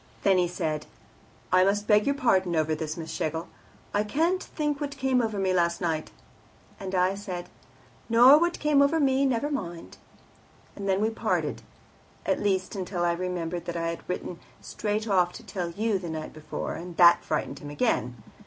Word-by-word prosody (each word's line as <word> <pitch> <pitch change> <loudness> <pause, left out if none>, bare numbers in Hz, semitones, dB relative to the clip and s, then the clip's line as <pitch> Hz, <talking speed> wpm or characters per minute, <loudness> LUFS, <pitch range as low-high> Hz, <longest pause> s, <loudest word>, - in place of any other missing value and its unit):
Then 190 -2 +4
he 175 - +2
said, 155 -3 -3 0.7
'I 185 0 +6
must 205 +1 +1
beg 210 +1 +4
your 280 - +2
pardon 190 -10 +2
over 155 0 +1
this, 155 0 -4
Miss 160 -1 -6
Schlegel; 160 +2 -3 0.5
I 205 - +2
can't 330 - +1
think 295 -2 -3
what 285 -1 -4
came 260 -2 +2
over 220 -3 -2
me 190 -1 +1
last 170 -1 +1
night.' 160 -3 -2 0.7
And 190 -1 -4
I 185 +1 +3
said, 185 -3 -6 0.6
'Nor 245 +6 +8
what 345 -2 -1
over 295 +1 +4
me; 275 -1 +3
never 265 +3 0
mind.' 175 - -5 0.8
And 200 -1 -4
then 190 +1 +2
we 220 +1 +1
parted 225 - -1 0.6
at - - +1
least, 190 -1 0
until 185 -2 -3
I 170 - +2
remembered 175 -1 -3
that 170 0 -4
I 165 0 -1
had 170 - -7
written 180 -1 -4 0.2
straight 215 +1 -3
off 180 -3 +2
to 235 - -10
tell 185 -3 -4
you 210 +3 0
the 175 -2 -6
night 155 -1 -5
before, 155 0 -5
and 175 0 -8
that 175 0 +7
frightened 140 -2 -2
him 145 - -8
again. 125 - -1
190 Hz, 180 wpm, -27 LUFS, 170-230 Hz, 0.8 s, Nor